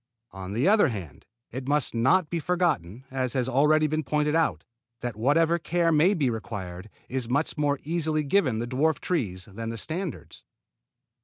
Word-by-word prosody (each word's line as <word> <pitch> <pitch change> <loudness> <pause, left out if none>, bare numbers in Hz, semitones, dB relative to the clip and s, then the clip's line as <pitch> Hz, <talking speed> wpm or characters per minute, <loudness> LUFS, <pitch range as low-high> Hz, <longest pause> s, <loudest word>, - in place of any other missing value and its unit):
On 95 0 -7
the 120 - +1
other 210 +1 +5
hand 90 - -7 0.2
it 130 +2 -6
must 145 -1 +1
not 135 +10 +3
be 170 - 0
forgotten, 150 - -1
as 130 -2 -2
has 130 -2 0
already 150 +4 +3
been 155 +1 0
pointed 150 +1 0
out, 165 0 +1 0.4
that 120 -2 -3
whatever 160 +9 +2
care 170 0 +1
may 165 +6 +4
be 145 -5 +1
required 100 -4 -6 0.2
is 125 -2 -3
much 145 +5 0
more 145 -2 +1
easily 155 -1 0
given 140 - +2
the 115 - -2
dwarf 140 +6 +1
trees 100 - -2
than 115 +3 -6
the 115 - -5
standards. 145 - -5
140 Hz, 170 wpm, -26 LUFS, 115-160 Hz, 0.4 s, other